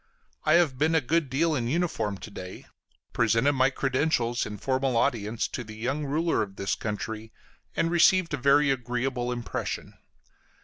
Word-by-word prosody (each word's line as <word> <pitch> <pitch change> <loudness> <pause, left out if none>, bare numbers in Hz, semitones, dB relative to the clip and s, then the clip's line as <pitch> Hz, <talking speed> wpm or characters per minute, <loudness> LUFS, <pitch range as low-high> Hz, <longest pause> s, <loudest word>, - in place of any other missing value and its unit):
I 155 - +4
have 155 -7 +3
been 160 +2 +3
a - - +5
good 155 +2 0
deal 155 +5 +1
in 120 -5 -1
uniform 125 - -1
to 105 - -10
day; 90 -2 -9 0.5
presented 115 +5 +3
my 130 0 +3
credentials, 130 -3 0
in 105 -1 -6
formal 130 +2 0
audience, 110 -1 0
to 125 - -5
the 110 -1 -10
young 130 +7 -2
ruler 160 +4 +1
of 100 -2 -4
this 100 0 -1
country, 110 +1 -4 0.4
and 165 - +1
received 175 0 +4
a - - +1
very 140 +2 +4
agreeable 125 0 -2
impression. 120 -1 -4
130 Hz, 165 wpm, -27 LUFS, 115-150 Hz, 0.5 s, a